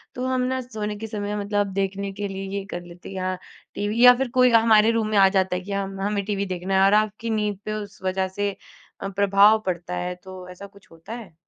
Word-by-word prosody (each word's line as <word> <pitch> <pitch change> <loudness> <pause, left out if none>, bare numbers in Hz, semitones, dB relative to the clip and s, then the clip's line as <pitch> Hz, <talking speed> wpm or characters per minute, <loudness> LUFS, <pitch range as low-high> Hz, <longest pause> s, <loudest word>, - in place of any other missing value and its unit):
तो 250 - -3
हम 260 0 0
ना 260 +1 -1
सोने 215 -4 -5
के 220 +2 -6
समय 205 -1 -4
मतलब 205 -1 -1
देखने 195 0 -2
के 205 +1 -4
लिए 195 0 -6
ये 200 - -3
कर 175 - -4
लेते 175 +1 -12
या 185 0 -2 0.4
टीवी 210 +4 0
या 250 - +11
फिर 265 0 -1
कोई 250 0 +7
हमारे 225 -1 +5
रूम 225 -1 0
में 215 - +1
आ 195 -1 +7
जाता 190 -2 +1
है 180 - -3
कि 195 +2 -9
हम 195 -1 -3
हमें 200 0 -1
टीवी 200 -1 -1
देखना 185 0 -3
है 190 - +4
और 195 - +4
आपकी 215 +2 -6
नींद 210 -2 -1
पे 215 - -3
उस 210 -1 -7
वज़ह 190 0 0
से 205 0 +1 0.5
अ, - - -3
प्रभाव 200 +2 +5
पड़ता 180 -1 -3
है, 180 0 -3
तो 185 0 -11
ऐसा 180 +2 -10
कुछ 200 0 -21
होता 165 +6 -10
है? 225 -8 -9
200 Hz, 240 wpm, -24 LUFS, 190-215 Hz, 0.5 s, या